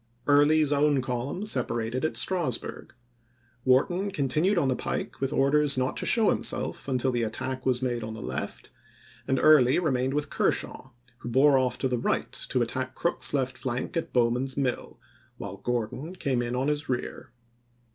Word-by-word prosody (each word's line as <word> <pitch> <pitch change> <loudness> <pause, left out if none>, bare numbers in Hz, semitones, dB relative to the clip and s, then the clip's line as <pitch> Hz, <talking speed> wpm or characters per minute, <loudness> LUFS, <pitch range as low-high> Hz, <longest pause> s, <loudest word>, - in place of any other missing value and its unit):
Early's 145 +1 +4
own 145 -1 +3
column 130 - -3
separated 120 - -1
at 155 - 0
Strasburg. 170 -14 -2 0.7
Wharton 175 +10 +2
con 140 -8 -1
tinued 165 +9 +2
on 165 - +2
the 130 - +1
pike - - -4
with 135 0 0
orders 145 0 +2
not 130 0 0
to - - -2
show 225 -3 +4
himself - - -2
until 130 -1 +1
the 120 -1 -1
attack 130 +4 -3
was 130 0 +1
made 120 -2 -1
on 110 0 -6
the 110 - -8
left, - - -5 0.6
and 135 - +1
Early 135 -4 +6
remained 135 -5 0
with 150 -1 -2
Kershaw, 135 - -1 0.3
who 120 - -7
bore 135 +2 +5
off 130 -1 0
to 130 - 0
the 125 -2 -1
right - - -1
to 125 - 0
attack 130 +2 -4
Crook's 170 - 0
left 130 -2 -1
flank 130 -1 -3
at 165 - -2
Bowman's 125 +2 +1
Mill, 130 -3 -2 0.4
while - - -7
Gordon 125 +8 -3
came 135 -8 -1
in 120 0 -3
on 130 +2 0
his 150 0 -1
rear. 130 +1 -4
130 Hz, 175 wpm, -27 LUFS, 125-150 Hz, 0.7 s, Early